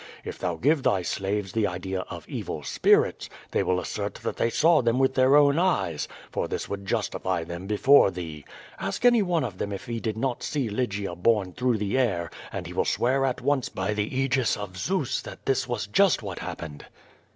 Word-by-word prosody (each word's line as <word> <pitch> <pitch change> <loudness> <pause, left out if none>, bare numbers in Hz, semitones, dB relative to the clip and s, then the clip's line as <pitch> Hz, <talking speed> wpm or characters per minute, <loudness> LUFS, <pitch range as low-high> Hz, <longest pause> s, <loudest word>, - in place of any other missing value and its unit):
If - - -6
thou 90 -2 -1
give 145 - +2
thy 95 -7 +2
slaves 95 +1 -2
the 110 0 +1
idea 95 +1 -3
of - - -8
evil - - -5
spirits, - - +2 0.2
they - - +1
will 90 0 +1
assert 100 +2 -4
that - - -3
they 115 - +2
saw 160 +5 +4
them 120 0 +1
with 130 0 +3
their 130 +1 +5
own 145 +1 +5
eyes, 100 - 0 0.2
for - - -1
this - - -4
would 100 -1 -6
justify 90 -2 -1
them 85 +3 -7
before 105 +3 +5
thee. 80 -5 -7 0.4
Ask 100 - -3
any 240 -2 +6
one 175 -5 +1
of 105 -7 -5
them 100 - -2
if 100 +5 -5
he 120 -2 -3
did 110 -2 -3
not 125 +1 -1
see 140 -6 -1
Lygia 105 -4 -2
borne 95 0 +1
through 125 0 +1
the 105 +5 0
air, 90 -10 0 0.2
and - - -5
he - - -7
will - - +1
swear 135 +2 +1
at 130 -2 -1
once 135 0 +1
by 95 +2 -2
the 105 +5 -2
Aegis 130 -2 +1
of 100 -2 -7
Zeus 150 - -1
that - - -11
this 135 -2 +1
was 120 -4 -2
just 165 - +3
what 95 -3 -5
happened.' 80 -4 -7
110 Hz, 205 wpm, -26 LUFS, 95-130 Hz, 0.4 s, any